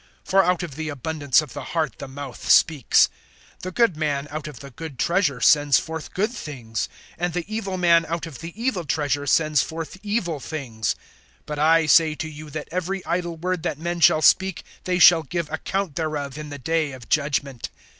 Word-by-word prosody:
For 195 0 +4
out 180 0 +1
of 165 -5 -6
the 160 0 -3
abundance 145 +1 +1
of 135 -6 -11
the - - -6
heart 155 -6 -1
the - - -6
mouth 135 -2 -8
speaks. 150 -8 +5 0.5
(35)The 185 0 -6
good 230 -8 +3
man 145 -2 -1
out 155 0 -5
of 145 -6 -9
the 140 -1 -10
good 155 +1 -8
treasure 170 -6 +1
sends 145 +1 +5
forth 160 -1 -5
good 210 +5 +1
things; 120 - -5 0.3
and 175 0 -1
the 175 -1 -2
evil 210 -3 -3
man 170 -2 +4
out 165 0 -3
of 160 -6 -10
the 165 +1 -7
evil 230 -7 -1
treasure 145 -2 -1
sends 155 -1 +3
forth 165 +2 -6
evil 205 -7 -2
things. 125 -8 -3 0.5
(36)But 150 -1 -5
I 160 +2 +4
say 155 +1 +5
to 160 - -4
you, 155 0 -9
that 150 +1 -6
every 185 +2 -3
idle 170 -1 -2
word 180 +1 -2
that 150 - -2
men 170 +2 -3
shall 155 -1 +5
speak, 190 -1 +3 0.2
they 180 -1 +1
shall 175 -1 +8
give 160 +2 -4
account 185 0 -2
thereof 150 -4 -3
in 150 0 -7
the 145 - -6
day 155 +1 -1
of 130 -3 -11
judgment. 140 -3 -1
160 Hz, 195 wpm, -23 LUFS, 145-175 Hz, 0.5 s, shall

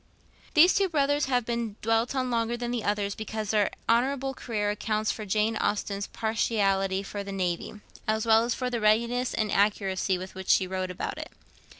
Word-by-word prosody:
These 335 +4 +7
two 390 -1 +2
brothers 290 -2 +2
have 250 -3 +1
been 235 -3 -2
dwelt 225 +3 +1
on 255 -1 -1
longer 230 0 0
than 240 0 -3
the 240 -3 -2
others 205 -1 0
because 220 -1 -4
their 210 -2 +3 0.2
honourable 270 +3 +1
career 210 -5 -2
accounts 215 0 -1
for 215 -2 -6
Jane 215 +3 +1
Austen's 200 -1 -1
partiality 195 -4 0
for 200 0 -5
the 200 - -7
Navy, 180 0 -2 0.3
as 220 +1 +1
well 225 0 +5
as 235 0 -1
for 250 -1 -2
the 235 -2 -2
readiness 235 +4 +2
and 215 -2 0
accuracy 195 -2 +1
with 185 +1 -8
which 190 0 -8
she 190 - +5
wrote 185 0 -3
about 180 - -4
it. - - -6
220 Hz, 190 wpm, -27 LUFS, 200-240 Hz, 0.3 s, These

